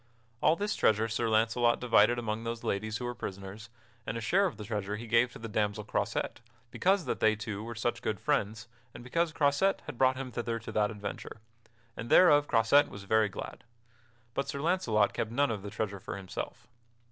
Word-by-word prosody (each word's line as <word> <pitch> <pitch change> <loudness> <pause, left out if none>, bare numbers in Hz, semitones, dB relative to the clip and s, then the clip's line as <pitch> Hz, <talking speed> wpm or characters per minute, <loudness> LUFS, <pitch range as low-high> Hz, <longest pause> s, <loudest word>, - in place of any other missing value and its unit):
All 155 - +4
this 205 +3 -2
treasure 110 +1 +3
Sir 115 +1 -1
Launcelot 115 +2 +2
divided 120 -1 +4
among 115 -1 -3
those 115 0 -4
ladies 105 +2 -2
who 125 - -5
were 120 - -3
prisoners, 100 0 -7 0.3
and - - -4
a - - -2
share 180 - +2
of 175 - -7
the 105 - -7
treasure 105 -2 -3
he 115 +3 -7
gave 115 +2 +3
to - - -10
the 115 - -7
damsel 105 -1 -1
Croisette, 105 - -2 0.3
because 190 -2 +2
that - - -2
they 110 0 +4
two 105 -1 -5
were 115 +1 -6
such 120 +2 -2
good 105 -3 -2
friends 110 -6 -1 0.3
and - - -9
because 165 +6 0
Croisette 150 +6 +2
had 120 - -8
brought 130 0 +4
him 130 -1 -5
thither 115 -1 -2
to 115 - -8
that 105 -1 +1
adventure, 105 0 -7 0.6
and 115 - -6
thereof 145 -5 +6
Croisette 120 +5 +4
was 100 - -9
very 110 +1 +2
glad. - - -8 0.7
But 140 - -2
Sir 140 - -3
Launcelot 125 - +2
kept 110 - -2
none 135 +2 +1
of 105 -3 -4
that 100 0 -7
treasure 100 -2 -3
for 95 - -6
himself. 95 -2 -7
115 Hz, 205 wpm, -30 LUFS, 105-130 Hz, 0.7 s, thereof